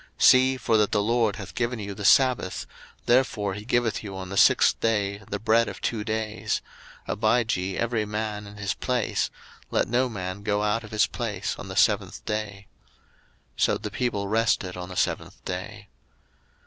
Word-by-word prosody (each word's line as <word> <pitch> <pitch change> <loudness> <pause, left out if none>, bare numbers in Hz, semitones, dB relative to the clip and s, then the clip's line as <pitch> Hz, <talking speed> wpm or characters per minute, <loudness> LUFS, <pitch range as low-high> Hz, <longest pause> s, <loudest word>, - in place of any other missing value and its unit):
02:016:029 - - -13
See, 130 +1 +6
for 115 -2 +2
that 105 -1 +2
the 105 - +2
LORD 115 -1 +2
hath 100 -2 -8
given 120 0 -1
you 100 -2 -5
the 100 0 -6
sabbath, 125 -8 +3 0.4
therefore 120 -5 +2
he 105 +2 -7
giveth 120 -3 0
you 100 -2 -6
on 95 -1 -6
the 100 - -5
sixth - - +5
day 105 -3 0
the 105 - -2
bread 115 +2 +3
of - - -6
two 110 -3 -2
days; 110 0 -2 0.4
abide 120 -2 +2
ye 95 +1 -3
every 115 -2 0
man 105 0 -4
in 105 +1 -11
his 100 -1 -1
place, 125 -3 -1 0.4
let - - +1
no 125 +2 +1
man 95 -2 -5
go 105 0 0
out 105 +2 0
of 105 - -10
his 110 +1 +3
place 115 -4 -3
on - - -7
the - - -7
seventh - - +1
day. 105 -2 -4 0.9
02:016:030 - - -2
So - - +3
the - - -6
people 105 -5 -1
rested 110 -4 +1
on 90 0 -7
the 90 - -7
seventh - - -2
day. - - -6
105 Hz, 185 wpm, -26 LUFS, 100-115 Hz, 0.9 s, See